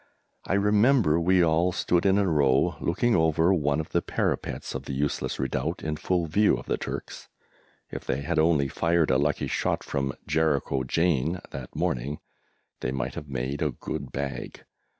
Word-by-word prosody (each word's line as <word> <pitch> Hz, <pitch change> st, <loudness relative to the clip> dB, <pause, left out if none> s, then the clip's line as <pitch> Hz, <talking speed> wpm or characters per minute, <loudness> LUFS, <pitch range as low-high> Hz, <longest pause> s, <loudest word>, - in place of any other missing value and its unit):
I -, -, 0 dB
remember 105 Hz, -, +4 dB
we 90 Hz, +1 st, +4 dB
all 85 Hz, +2 st, +2 dB
stood 90 Hz, +1 st, +1 dB
in 95 Hz, +1 st, +4 dB
a 100 Hz, -, +3 dB
row 75 Hz, 0 st, +3 dB
looking 115 Hz, +7 st, +1 dB
over 80 Hz, +2 st, +3 dB
one 75 Hz, -3 st, +1 dB
of 80 Hz, -, -4 dB
the -, -, +1 dB
parapets -, -, -2 dB
of -, -, -5 dB
the -, -, -5 dB
useless 70 Hz, +1 st, -1 dB
redoubt 65 Hz, -2 st, -2 dB
in 75 Hz, -1 st, -2 dB
full 90 Hz, +2 st, 0 dB
view 100 Hz, +7 st, +3 dB
of -, -, -9 dB
the -, -, -1 dB
Turks; -, -, -6 dB, 0.6 s
if -, -, -6 dB
they 70 Hz, -, -1 dB
had 70 Hz, -, -1 dB
only 80 Hz, -3 st, +3 dB
fired 85 Hz, +1 st, +1 dB
a 65 Hz, -, +3 dB
lucky 75 Hz, 0 st, 0 dB
shot -, -, -1 dB
from 70 Hz, -1 st, -2 dB
"Jericho 75 Hz, -4 st, +1 dB
Jane" 80 Hz, +2 st, +1 dB
that 65 Hz, -3 st, -8 dB
morning 70 Hz, +5 st, -1 dB, 0.6 s
they -, -, -2 dB
might 65 Hz, -1 st, -3 dB
have 75 Hz, -, -8 dB
made 65 Hz, +2 st, -3 dB
a 75 Hz, -, +2 dB
good 65 Hz, 0 st, -6 dB
bag! 70 Hz, 0 st, -5 dB
80 Hz, 175 wpm, -26 LUFS, 70-85 Hz, 0.6 s, remember